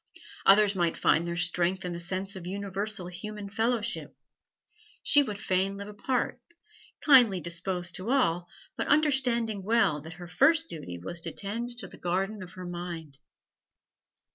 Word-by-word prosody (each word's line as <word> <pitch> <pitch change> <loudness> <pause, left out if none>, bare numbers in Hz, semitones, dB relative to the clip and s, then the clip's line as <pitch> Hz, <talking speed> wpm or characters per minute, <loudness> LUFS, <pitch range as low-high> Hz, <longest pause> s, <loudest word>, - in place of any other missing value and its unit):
Others 205 +1 +7
might 175 -3 0
find 170 +2 +3
their 170 - -2
strength 180 +2 0
in 180 - -3
the 170 - -5
sense 190 +3 -3
of 180 -2 -7
universal 200 +1 -3
human 200 +3 -6
fellowship; 230 +2 -1 0.9
she 290 - +6
would 210 -8 -3
fain 190 0 0
live 200 0 -7
apart, 240 +4 -2 0.6
kindly 245 - +7
disposed 175 +1 -3
to 185 +5 -5
all, 175 -10 +2 0.3
but - - -2
understanding 255 -8 +2
well 200 -8 +2
that 160 +2 -9
her 175 +1 -10
first 315 - +4
duty 90 - -6
was 170 - -6
to 165 - -4
tend 225 +7 -4
the - - -7
garden 195 +4 -1
of 180 -1 -9
her 185 -1 -8
mind. 170 -5 -6
190 Hz, 150 wpm, -29 LUFS, 175-220 Hz, 0.9 s, Others